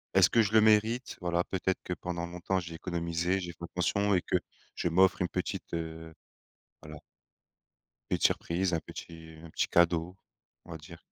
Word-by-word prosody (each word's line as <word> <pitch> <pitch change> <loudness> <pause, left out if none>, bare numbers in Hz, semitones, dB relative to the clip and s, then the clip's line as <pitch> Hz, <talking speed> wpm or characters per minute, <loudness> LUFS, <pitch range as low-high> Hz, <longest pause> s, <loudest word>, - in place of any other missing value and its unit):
est-ce 95 -2 +7
que 115 - +5
je 105 0 0
le 110 - +7
mérite? 110 +3 +3
Voilà, 85 0 +1
peut-être 95 0 -1
que 90 - -3
pendant 85 -1 -4
longtemps 90 +2 -2
j'ai 85 -2 -7
économisé, 85 +2 -1
j'ai 90 -2 -5
fait 85 +1 -14
attention 100 +4 +1
et 90 - +2
que - - +1 0.4
je - - -2
m'offre 95 +2 +4
une 90 - +2
petite, - - -4
heu 80 -1 -5 0.7
voilà 75 0 -9 1.1
petite - - 0
surprise, 90 +2 -1
un 85 - +1
petit 80 0 -10
un 85 - -10
petit - - 0
cadeau, 85 +1 +2 0.5
on - - -14
va 80 - -6
dire. 80 +2 -12
85 Hz, 180 wpm, -30 LUFS, 85-95 Hz, 1.1 s, est-ce